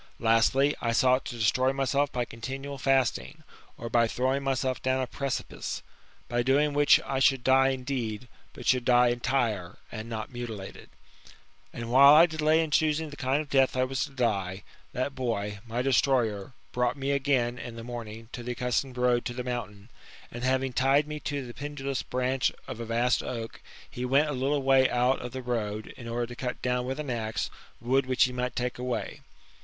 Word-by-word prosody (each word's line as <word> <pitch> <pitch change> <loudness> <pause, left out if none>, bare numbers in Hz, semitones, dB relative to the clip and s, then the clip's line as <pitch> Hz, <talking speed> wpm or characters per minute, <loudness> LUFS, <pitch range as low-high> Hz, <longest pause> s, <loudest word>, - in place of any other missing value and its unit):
Lastly, 115 +5 +3
I 115 -1 0
sought 130 +2 +3
to 120 - -6
destroy 130 +4 +2
myself 140 +1 0
by 125 -1 -1
continual 135 +4 -6
fasting, 135 +4 0 0.3
or 115 - -6
by 115 0 +3
throwing 130 +4 0
myself 130 -1 -1
down 130 0 +1
a 130 - 0
precipice; 135 +1 -4 0.4
by 120 0 0
doing 145 +4 +2
which 145 0 +6
I 135 - -1
should 135 -1 +3
die 135 0 +5
indeed, 125 -4 -3 0.3
but - - -10
should 125 -1 +3
die 125 0 +5
entire 120 -7 -1
[and 110 0 -6
not 110 -2 -5
mutilated]. 115 -5 -7 0.8
And 115 0 -6
while 140 +3 +8
I 165 +2 +8
delay 160 -1 +2
in 160 - -5
choosing 155 0 +1
the - - -8
kind 140 +2 0
of 145 - -18
death 135 -2 +3
1 130 0 +1
was 135 0 -1
to - - -12
die, 100 -8 -1 0.3
that 130 +3 -2
boy, 105 -6 -3
my 120 +2 -2
destroyer, 125 -5 +1 0.2
brought 125 +3 0
me 135 0 -1
again, 130 -4 +1
in 115 0 -7
the 115 - -8
morning, 115 -2 -7
to 125 - -6
the 125 +1 -4
accustomed 125 +1 -2
road 125 -1 +2
to 120 - -4
the 125 - -3
mountain; 115 -4 -5 0.4
and, 120 +1 -7
having 130 0 +1
tied 135 +4 +3
me 150 0 -5
to 140 -1 -4
the 120 - -9
pendulous 140 -2 -4
branch 130 +1 0 0.2
of 130 -3 -6
a 115 - -4
vast 120 +2 +1
oak, 115 -2 -6 0.3
he 125 - -6
went 140 +4 +3
a - - -2
little 135 +2 0
way 135 -1 +5
out 125 +2 +1
of 125 - -6
the 130 +1 -6
road, 110 -3 -3
in 115 - -10
order 120 +1 -2
to 120 +1 -9
cut 125 0 -4
down, 125 0 0
with 135 +3 -3
an 145 -4 -3
axe, 110 -2 -2 0.3
wood 130 +3 +1
which 130 -1 +3
he 125 - +1
might 125 0 -3
take 125 0 -2
away. 125 0 -3
125 Hz, 195 wpm, -28 LUFS, 120-135 Hz, 0.8 s, while